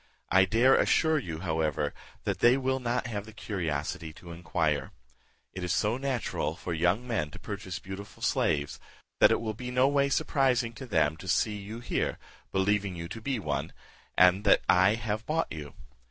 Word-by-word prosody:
I 95 Hz, +1 st, +6 dB
dare 120 Hz, +6 st, +4 dB
assure 160 Hz, -1 st, +3 dB
you, 85 Hz, -, -6 dB
however, 80 Hz, -4 st, -1 dB, 0.3 s
that -, -, -2 dB
they 120 Hz, +2 st, +5 dB
will 130 Hz, 0 st, 0 dB
not 125 Hz, 0 st, -1 dB
have 105 Hz, -3 st, -4 dB
the -, -, -9 dB
curiosity 80 Hz, -7 st, -3 dB
to 85 Hz, +2 st, -12 dB
inquire. 80 Hz, -4 st, -1 dB, 0.6 s
It 95 Hz, -, -5 dB
is 90 Hz, -, -1 dB
so 105 Hz, +7 st, +1 dB
natural 125 Hz, -, -2 dB
for 85 Hz, 0 st, -5 dB
young 90 Hz, +8 st, +1 dB
men 100 Hz, -11 st, -1 dB
to -, -, -11 dB
purchase 100 Hz, -2 st, -6 dB
beautiful 95 Hz, +2 st, -9 dB
slaves, 70 Hz, -3 st, 0 dB, 0.4 s
that -, -, +7 dB
it -, -, +2 dB
will 110 Hz, -2 st, -3 dB
be 125 Hz, +3 st, -6 dB
no 125 Hz, +1 st, +3 dB
way 140 Hz, 0 st, +2 dB
surprising 135 Hz, -5 st, +1 dB
to 130 Hz, +2 st, -9 dB
them 80 Hz, -6 st, +2 dB
to 95 Hz, -, -10 dB
see 105 Hz, +3 st, +1 dB
you 105 Hz, +4 st, -7 dB
here, -, -, -1 dB, 0.3 s
believing 100 Hz, 0 st, +1 dB
you 85 Hz, -1 st, -5 dB
to 110 Hz, -, -7 dB
be 135 Hz, +2 st, -1 dB
one, 105 Hz, -, -3 dB, 0.4 s
and 90 Hz, +3 st, +6 dB
that 100 Hz, -, +4 dB
I 95 Hz, +4 st, +5 dB
have 110 Hz, -1 st, -3 dB
bought 165 Hz, +1 st, 0 dB
you. 75 Hz, -3 st, -7 dB
100 Hz, 185 wpm, -29 LUFS, 85-120 Hz, 0.6 s, that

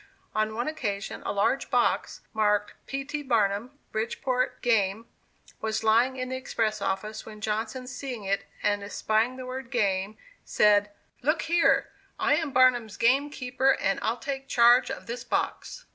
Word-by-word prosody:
On 215 Hz, 0 st, 0 dB
one 240 Hz, +4 st, -2 dB
occasion 210 Hz, -11 st, -3 dB
a -, -, 0 dB
large 205 Hz, +7 st, +1 dB
box, -, -, +1 dB
marked 210 Hz, -1 st, +1 dB
"P. 275 Hz, 0 st, -3 dB
T. 295 Hz, +1 st, -4 dB
Barnum, 230 Hz, 0 st, 0 dB
Bridgeport; 250 Hz, +3 st, -1 dB
Game," 220 Hz, -2 st, +2 dB, 0.6 s
was 220 Hz, 0 st, -1 dB
lying 235 Hz, +4 st, +3 dB
in 255 Hz, 0 st, -3 dB
the 260 Hz, -, -3 dB
express 220 Hz, -5 st, -1 dB
office, 210 Hz, +3 st, -3 dB
when 215 Hz, -1 st, -11 dB
Johnson 220 Hz, +4 st, -3 dB
seeing 250 Hz, -3 st, -6 dB
it, 195 Hz, 0 st, -1 dB, 0.2 s
and 205 Hz, 0 st, +1 dB
espying 220 Hz, +4 st, 0 dB
the 255 Hz, -, -7 dB
word 255 Hz, -1 st, -6 dB
"game," 200 Hz, -4 st, 0 dB, 0.3 s
said: 205 Hz, -1 st, +3 dB, 0.3 s
"Look 305 Hz, +6 st, +1 dB
here! 340 Hz, 0 st, +3 dB, 0.3 s
I -, -, +2 dB
am 320 Hz, -1 st, -1 dB
'Barnum's 250 Hz, -4 st, +3 dB
game 270 Hz, +5 st, +3 dB
keeper,' 260 Hz, -1 st, +1 dB
and 195 Hz, -, 0 dB
I'll 225 Hz, +2 st, 0 dB
take 270 Hz, +1 st, -5 dB
charge 245 Hz, 0 st, +5 dB
of -, -, -6 dB
this 235 Hz, +1 st, -5 dB
box." -, -, -3 dB
235 Hz, 160 wpm, -27 LUFS, 215-260 Hz, 0.6 s, charge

